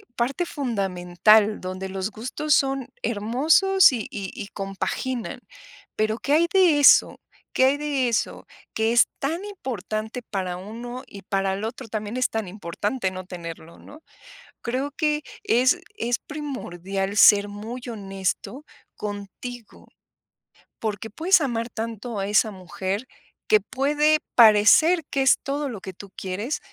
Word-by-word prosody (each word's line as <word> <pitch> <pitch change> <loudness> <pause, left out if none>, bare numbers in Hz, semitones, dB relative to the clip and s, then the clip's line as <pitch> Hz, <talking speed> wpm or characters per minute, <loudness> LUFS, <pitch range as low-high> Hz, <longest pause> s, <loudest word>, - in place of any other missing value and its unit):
parte 270 +9 -1
fundamental, 210 - +2
donde 185 +1 -5
los 190 +2 -3
gustos 255 +8 -2
son 270 -2 0 0.2
hermosos 285 - +4
y 235 -5 -3
y 195 -2 -6
y - - -7
compaginan. 210 +5 -4 0.6
Pero, 215 +1 +1
¿qué 275 - -3
hay 330 +3 +4
de 360 -6 +5
eso 285 - +6 0.3
qué 260 - +4
hay 270 +2 +4
de 285 -3 0
eso?, 230 - -2 0.3
que 220 +1 +1
es 240 - +6
tan 325 +7 -2
importante 230 - -5
para 185 -5 -3
uno 235 +6 -7
y 200 -4 -11
para 195 0 0
el 200 +3 -3
otro 240 +2 -6
también 215 +1 -4
es 255 - +1
tan 220 -3 -3
importante 195 +3 -3
no 185 0 -7
tenerlo, 170 -2 -9
¿no? 305 +2 -14 0.6
Creo 260 +4 -2
que 300 0 0 0.2
es 255 +9 +3 0.2
es 240 - -1
primordial 195 - -5
ser 205 0 +7
muy 220 +5 -7
honesto 195 +6 -4 0.3
contigo, 210 +3 -8 0.9
porque 215 0 -4
puedes 350 - +3
amar 235 -4 -2
tanto 225 -1 -5
a 195 - -2
esa 215 +1 +3
mujer 190 +4 -4 0.4
que 215 -1 +5
puede 295 +7 +2 0.2
parecer 235 - +6
que 275 - 0
es 265 - +5
todo 280 +1 -2
lo 225 -5 -6
que 190 - -7
tú 195 +2 -12
quieres, 205 +9 -3
225 Hz, 140 wpm, -24 LUFS, 200-270 Hz, 0.9 s, ser